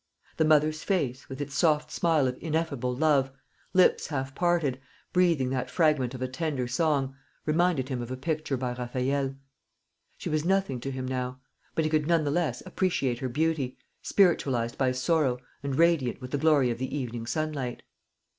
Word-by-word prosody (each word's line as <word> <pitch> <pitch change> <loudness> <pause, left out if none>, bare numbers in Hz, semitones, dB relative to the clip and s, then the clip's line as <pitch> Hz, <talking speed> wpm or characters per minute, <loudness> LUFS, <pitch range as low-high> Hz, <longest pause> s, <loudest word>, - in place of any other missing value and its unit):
The 160 - +3
mother's 155 0 +3
face, 140 -10 -1
with 135 0 -7
its 145 -1 -4
soft 150 0 +2
smile 160 -5 +2
of 125 - -2
ineffable 155 -6 -1
love, 140 -2 +3 0.4
lips 185 0 +4
half 135 -3 -3
parted, 160 -6 +1 0.3
breathing 170 -8 +3
that 130 -1 -2
fragment 150 -7 +2
of 130 - -4
a - - 0
tender 135 -2 -2
song, 135 0 0 0.3
reminded 155 -4 +2
him 130 -3 -2
of 120 - -6
a 130 - -4
picture 155 -1 -2
by 125 -1 -2
Raffaelle. 130 +3 -1 0.8
She - - -6
was 155 -1 0
nothing 190 -7 +1
to 135 - -4
him 130 -1 -4
now; 130 0 -3 0.4
but 160 - +2
he 155 - 0
could 155 -1 +2
not 170 -2 +3
the 145 - 0
less 150 -7 -1
appreciate 170 -10 0
her 130 - -2
beauty, 145 -1 0 0.2
spiritualised 135 - +2
by 130 -2 +2
sorrow, 130 0 +1 0.2
and 140 -1 -2
radiant 165 -6 +3
with 130 -1 -8
the 145 - 0
glory 145 -5 +4
of 115 - -4
the 130 +3 -3
evening 120 -4 -4
sunlight. 145 -4 -3
140 Hz, 175 wpm, -28 LUFS, 130-160 Hz, 0.8 s, lips